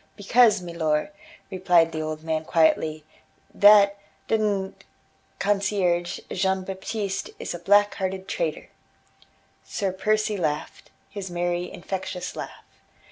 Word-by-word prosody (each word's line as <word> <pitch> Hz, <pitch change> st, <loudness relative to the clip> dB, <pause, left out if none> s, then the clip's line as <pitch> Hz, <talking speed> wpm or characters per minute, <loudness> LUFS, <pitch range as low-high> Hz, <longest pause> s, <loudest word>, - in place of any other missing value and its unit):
"Because, 215 Hz, -1 st, +4 dB
milor," 170 Hz, +1 st, -1 dB, 0.4 s
replied 180 Hz, -3 st, +3 dB
the 160 Hz, -1 st, -4 dB
old 155 Hz, 0 st, -5 dB
man 160 Hz, -1 st, -1 dB
quietly, 160 Hz, -1 st, +2 dB, 0.5 s
"that 200 Hz, -1 st, +6 dB, 0.3 s
d 225 Hz, -, +2 dB
d 200 Hz, -3 st, 0 dB, 0.7 s
concierge, 195 Hz, -4 st, 0 dB
Jean 190 Hz, 0 st, 0 dB
Baptiste, 195 Hz, +1 st, -4 dB
is -, -, -5 dB
a 175 Hz, -, -6 dB
black 205 Hz, +3 st, +4 dB
hearted 190 Hz, 0 st, -4 dB
traitor." -, -, -3 dB, 0.9 s
Sir 195 Hz, -2 st, -2 dB
Percy 215 Hz, +2 st, 0 dB
laughed, 150 Hz, -4 st, -3 dB, 0.2 s
his 195 Hz, -2 st, -7 dB
merry, 175 Hz, 0 st, -2 dB
infectious 180 Hz, 0 st, -5 dB
laugh. -, -, -8 dB
190 Hz, 115 wpm, -25 LUFS, 175-200 Hz, 0.9 s, that